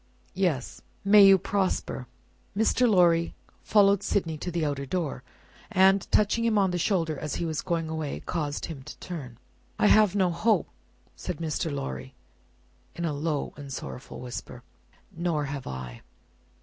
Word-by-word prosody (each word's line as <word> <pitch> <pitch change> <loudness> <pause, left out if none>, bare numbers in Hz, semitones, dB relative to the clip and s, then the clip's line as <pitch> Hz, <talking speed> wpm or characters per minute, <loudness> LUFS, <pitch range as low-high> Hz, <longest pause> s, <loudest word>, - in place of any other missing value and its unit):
"Yes." 180 -9 -1 0.2
"May 205 +1 +8
you 195 0 +8
prosper!" 190 -9 -1 0.5
Mr. 235 +3 +3
Lorry 170 -4 +4 0.3
followed 200 -2 +4
Sydney 170 -6 -1
to 180 - -4
the 170 -2 -1
outer 140 -2 -2
door, 160 -5 -2 0.5
and, 195 -1 +4
touching 215 +2 +3
him 230 -2 +2
on 195 -2 +3
the 175 - -1
shoulder 165 -5 0
as 150 - -4
he 170 - -2
was 160 -2 -2
going 165 -2 -1
away, 160 -2 -3
caused 150 -4 -2
him 155 -5 -7
to - - -10
turn. 140 -10 -7 0.4
"I - - +2
have 210 -2 +5
no 185 -3 +3
hope," 210 +7 +2 0.5
said 180 -4 -5
Mr. 160 0 -2
Lorry, 65 - -5 0.8
in 170 - -3
a 155 - -1
low 150 0 -2
and 140 -2 -9
sorrowful 125 0 -7
whisper. 125 -1 -7 0.5
"Nor 165 -3 -1
have 140 -1 -5
I." 65 -2 -7
170 Hz, 155 wpm, -27 LUFS, 145-195 Hz, 0.8 s, May